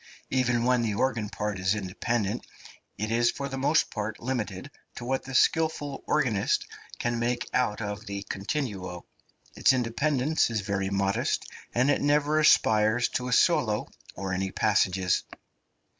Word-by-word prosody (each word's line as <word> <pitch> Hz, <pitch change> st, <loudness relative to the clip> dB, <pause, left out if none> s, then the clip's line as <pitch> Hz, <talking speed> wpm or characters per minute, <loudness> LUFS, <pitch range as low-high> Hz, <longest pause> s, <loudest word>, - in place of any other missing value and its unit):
Even 125 Hz, -2 st, +2 dB
when 125 Hz, 0 st, +3 dB
the 110 Hz, -3 st, -1 dB
organ 115 Hz, -3 st, 0 dB
part 105 Hz, -3 st, -3 dB
is 95 Hz, +3 st, +1 dB
independent 105 Hz, +2 st, -2 dB, 0.5 s
it 110 Hz, +2 st, -3 dB
is 120 Hz, +1 st, +3 dB
for 140 Hz, -, -3 dB
the 135 Hz, 0 st, -5 dB
most 150 Hz, +4 st, +2 dB
part 105 Hz, 0 st, -4 dB
limited 110 Hz, -7 st, -4 dB, 0.2 s
to 120 Hz, -, -7 dB
what 130 Hz, +1 st, 0 dB
the 135 Hz, 0 st, -6 dB
skilful 155 Hz, -3 st, +1 dB
organist 125 Hz, -10 st, +1 dB, 0.3 s
can 120 Hz, -1 st, -1 dB
make 120 Hz, 0 st, -1 dB
out 115 Hz, -4 st, +1 dB
of 105 Hz, +1 st, -5 dB
the 100 Hz, 0 st, -4 dB
continuo; 100 Hz, -, -4 dB, 0.5 s
its -, -, +4 dB
independence 135 Hz, +4 st, +1 dB
is 110 Hz, -3 st, -1 dB
very 100 Hz, -1 st, -2 dB
modest, 100 Hz, 0 st, 0 dB, 0.3 s
and 130 Hz, +4 st, +3 dB
it -, -, +1 dB
never 150 Hz, +1 st, +2 dB
aspires 110 Hz, -5 st, +4 dB
to 125 Hz, -, -2 dB
a -, -, -3 dB
solo -, -, +3 dB, 0.3 s
or 95 Hz, 0 st, -3 dB
any 95 Hz, +1 st, -1 dB
passages. 95 Hz, -3 st, +1 dB
115 Hz, 150 wpm, -27 LUFS, 100-130 Hz, 0.5 s, its